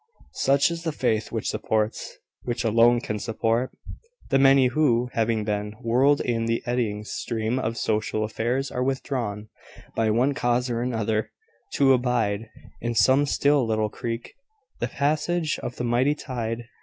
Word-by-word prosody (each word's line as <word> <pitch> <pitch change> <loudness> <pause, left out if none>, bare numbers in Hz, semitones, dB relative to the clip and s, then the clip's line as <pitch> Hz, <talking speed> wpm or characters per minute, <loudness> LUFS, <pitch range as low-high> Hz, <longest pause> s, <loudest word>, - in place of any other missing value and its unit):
Such 140 +4 +3
is 170 0 -4
the 165 -1 -2
faith 110 -7 -1
which - - -3
supports, 110 0 -2 0.2
which 120 0 -3
alone 115 +1 +4
can 105 -3 -3
support, 115 +3 0 0.6
the 135 - +4
many 135 -1 +6
who, 125 -2 +2
having 115 -1 +1
been 105 0 -2
whirled 125 +5 +2
in 115 -2 -1
the 115 0 -1
eddying 115 -4 -1
stream 110 +2 -2
of 115 -2 -2
social 110 0 -1
affairs, 120 +5 -2
are 125 - -1
withdrawn, 120 -6 -3 0.5
by 110 -1 +1
one 125 +6 +2
cause 125 -2 0
or 115 0 -1
another, 110 -3 -1 0.4
to 135 -1 +5
abide, 115 -4 0 0.3
in 120 0 -3
some 130 +7 +4
still 140 -1 +3
little 110 -2 0
creek, 115 +2 -5 0.5
the - - -1
passage 155 +3 0
of 120 - -5
the - - -4
mighty 125 +5 +2
tide. 120 -5 -4
120 Hz, 155 wpm, -25 LUFS, 110-130 Hz, 0.6 s, many